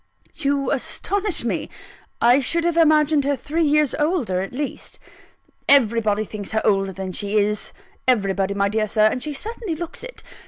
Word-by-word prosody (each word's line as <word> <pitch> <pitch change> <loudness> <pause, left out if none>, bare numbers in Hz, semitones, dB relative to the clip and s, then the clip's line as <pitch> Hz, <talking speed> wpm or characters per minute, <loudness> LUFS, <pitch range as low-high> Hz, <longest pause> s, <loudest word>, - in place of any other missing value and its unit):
"You 280 -3 -1
astonish 400 - -1
me! 235 - -2 0.5
I 245 +3 +5
should 330 +5 +1
have 340 -1 0
imagined 305 -2 +4
her 285 0 +1
three 300 +6 -2
years 300 -2 +2
older 295 - 0
at 195 - -5
least." 280 +2 -5 0.7
"Everybody 225 -6 +4
thinks 210 -1 -7
her 220 - +1
older 195 -2 +2
than 190 0 -6
she 205 +3 -2
is 210 0 0 0.4
everybody, 200 -5 +1
my 200 0 +1
dear 215 +1 0
Sir 215 +1 +2
and 250 - -3
she 300 +1 -4
certainly 430 - -5
looks 345 +6 -7
it. - - -10
255 Hz, 165 wpm, -22 LUFS, 210-305 Hz, 0.7 s, I